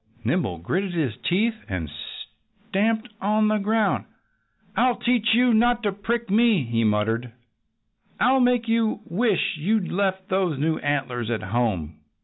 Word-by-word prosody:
Nimble 120 - 0
gritted 180 - -2
his 140 -10 -1
teeth 215 +6 +2 0.2
and 90 -5 -3 0.8
stamped 220 +3 +1
upon 215 +1 +2
the 215 0 +1
ground. 215 +1 +1 0.7
"I'll 250 0 +3
teach 235 -2 +2
you 245 0 +4
not 240 +2 +3
to 205 - +1
prick 230 +4 -2
me!" 220 - +4
he 115 -1 -1
muttered. 110 +3 0 0.9
"I'll 265 +2 +4
make 245 -2 +2
you 225 -1 +1
wish 200 -2 0
you'd 200 +3 0
left 190 0 -1
those 185 -6 0
new 155 +3 0
antlers 130 -5 -2
at 115 -2 -2
home!" 95 -8 -2
195 Hz, 140 wpm, -24 LUFS, -, 0.9 s, you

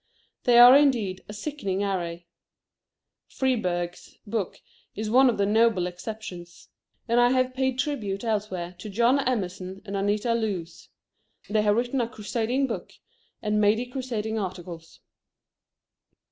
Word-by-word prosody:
They 240 -1 +5
are, 245 +2 +10
indeed, 235 -10 +2
a - - -6
sickening 210 -5 -3
array. 175 -3 -3 1.0
Freeburg's 180 -10 -2
book 210 -3 -3 0.4
is 215 0 -3
one 260 +2 +6
of 235 - -1
the 200 - +2
noble 220 -3 +3
exceptions. 180 -1 -8 0.4
And 235 +1 +3
I 245 0 +5
have 255 0 +1
paid 260 -1 0
tribute 230 -8 -2
elsewhere 200 -6 -2
to 210 - -7
John 235 +6 +3
Emerson 190 -7 -2
and 200 -1 -5
Anita 205 +4 0
Loos. 195 -8 -3 0.6
They 215 0 +3
have 210 -1 +3
written 245 +3 0
a 230 - -2
crusading 235 +3 -1
book, 245 - -5 0.5
and 210 0 +1
many 215 +4 +3
crusading 235 -4 -3
articles. 175 -4 -7
215 Hz, 130 wpm, -26 LUFS, 190-245 Hz, 1.0 s, are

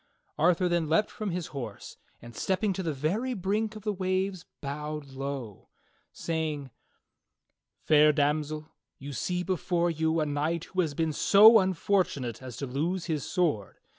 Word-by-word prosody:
Arthur 180 +3 +3
then 170 -3 0
leaped 165 +7 +2
from 215 -2 -4
his 175 -1 -3
horse, 120 -7 -7 0.3
and 120 0 -11
stepping 195 +1 0
to 190 - -3
the 165 -3 -1
very 195 - -1
brink 210 +3 -1
of 215 - -9
the 210 -1 -1
waves, 185 -1 -1
bowed 150 +1 -5
low, 135 -6 -6 0.4
saying: 155 -5 -3 1.1
"Fair 150 0 +6
Damsel, 150 +1 0 0.3
you 140 +1 -8
see 180 +7 -2
before 175 -1 0
you 160 0 0
a 155 - +1
knight 150 +3 -1
who 185 0 -1
has 155 -5 -2
been 160 0 0
so 215 +8 +8
unfor 190 +1 +2
tunate 125 -8 -6
as 130 -2 -8
to 140 - -3
lose 165 +8 -2
his 155 -5 -2
sword. 160 - -1
160 Hz, 160 wpm, -28 LUFS, 145-185 Hz, 1.1 s, so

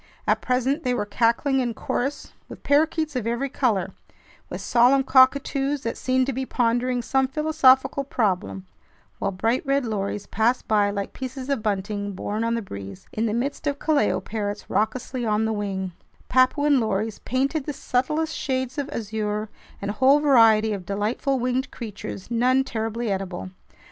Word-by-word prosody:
At - - +2
present 260 +4 0
they 250 -3 0
were 210 - -1
cackling 235 +5 +1
in 240 -3 -1
chorus 275 +6 -3 0.2
with - - -11
parakeets 310 +1 +2
of 235 -3 -2
every 240 +4 -1
color, 205 -9 0 0.6
with - - -5
solemn 250 +3 +4
cockatoos 270 +1 +3
that 230 - -2
seemed 260 0 +1
to 270 - -2
be 265 +2 -2
pondering 245 0 0
some 265 +2 +1
philosophical 275 -1 +3
problem, 195 -7 -1 0.5
while 200 - 0
bright 225 +6 0
red 275 -2 +1
lories 205 -2 -3
passed 230 +5 0
by 205 -2 +3
like 200 -1 -4
pieces 260 +1 -6
of 275 -5 0
bunting 205 0 -2
borne 210 +4 -3
on 230 0 0
the 230 - -3
breeze, 100 - -9
in 225 +1 0
the - - -1
midst 280 +5 -2
of 285 0 0
kalao 215 -12 +1
parrots 205 0 -5
raucously 245 +3 -1
on 215 -1 +1
the 220 - 0
wing, 195 -3 -3 0.4
Papuan 275 +2 +4
lories 215 -1 -1
painted 270 +3 -1
the - - 0
subtlest 300 +4 -1
shades 260 +1 -2
of 285 0 -3
azure, 215 -3 -3 0.3
and 200 +1 -3
a 210 - -10
whole 275 +3 +6
variety 225 -7 +5
of 195 -3 -5
delightful 210 +8 -1
winged 255 +1 -1
creatures, 210 -2 -8
none 255 +3 +3
terribly 225 -2 -3
edible. 190 -1 -4
240 Hz, 165 wpm, -24 LUFS, 210-265 Hz, 0.6 s, whole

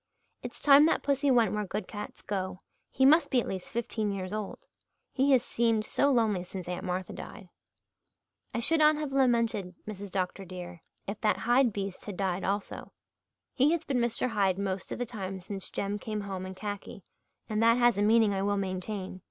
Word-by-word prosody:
"It's - - -8
time 290 +1 +8
that - - +1
pussy 280 0 +1
went 230 -6 +4
where 210 0 -1
good 205 0 -4
cats 210 -1 -8
go. 190 -2 -3 0.3
He 265 - +2
must 315 +5 +6
be 255 - +3
at - - -3
least 190 -1 -5
fifteen 220 -2 -2
years 190 0 -4
old. 215 - -5 0.5
He 270 +1 +2
has 250 -2 +4
seemed 230 -3 +1
so 280 - +2
lonely 220 -8 +2
since 185 -1 -7
Aunt 180 0 -4
Martha 185 0 -3
died." 195 -6 -9 1.0
"I 235 - -2
should 325 +7 +4
not 305 0 +6
have 300 -2 -4
lamented, 230 -8 +1
Mrs. 205 -1 -6
Dr. 185 +1 -2
dear, 180 -2 -9 0.2
if 200 +2 -6
that 215 -1 +2
Hyde 245 +1 +3
beast 195 -2 -5
had 205 -3 -6
died 190 -1 -1
also. 200 +1 -3 0.6
He 285 +5 +3
has 330 -1 -2
been 265 -3 0
Mr. 240 +1 0
Hyde 195 -5 +1
most 195 -1 -3
of - - -3
the 245 - -2
time 195 -5 -5
since 195 +1 -7
Jem 200 +1 -3
came 215 -1 -4
home 190 -2 -5
in 190 - -8
khaki, 205 -1 -6 0.4
and 215 0 -1
that 230 +1 +5
has 240 -4 +4
a - - +2
meaning 215 0 +4
I 195 - -1
will 205 +1 +1
maintain. 190 0 -4
210 Hz, 200 wpm, -29 LUFS, 190-240 Hz, 1.0 s, time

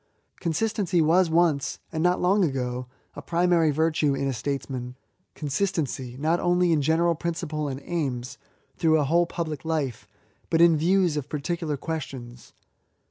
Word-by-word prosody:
Consistency 190 +1 0
was 165 +3 +4
once, 160 -4 +2
and 160 -1 -2
not 180 +1 +2
long 195 +3 +3
ago, 125 -4 -2 0.3
a - - -7
primary 170 -2 +2
virtue 155 -1 +1
in 140 - -1
a 135 - -1
Statesman, 130 -1 -4 0.2
— - - -46
consistency, 140 -5 -2
not 160 +5 +1
only 175 0 +2
in 155 -3 +3
general 165 +4 +2
principle 160 -2 -3
and 135 -1 -4
aims, 135 -8 -3 0.4
through 160 -1 +3
a - - +2
whole 170 +5 +2
public 155 -5 -4
life, 150 -7 -2 0.4
but 165 - +2
in 170 -1 +6
views 175 0 +2
of 145 -1 -4
particular 155 0 -2
ques 160 +3 -3
tions. 120 -2 -11
160 Hz, 155 wpm, -25 LUFS, 140-170 Hz, 0.4 s, in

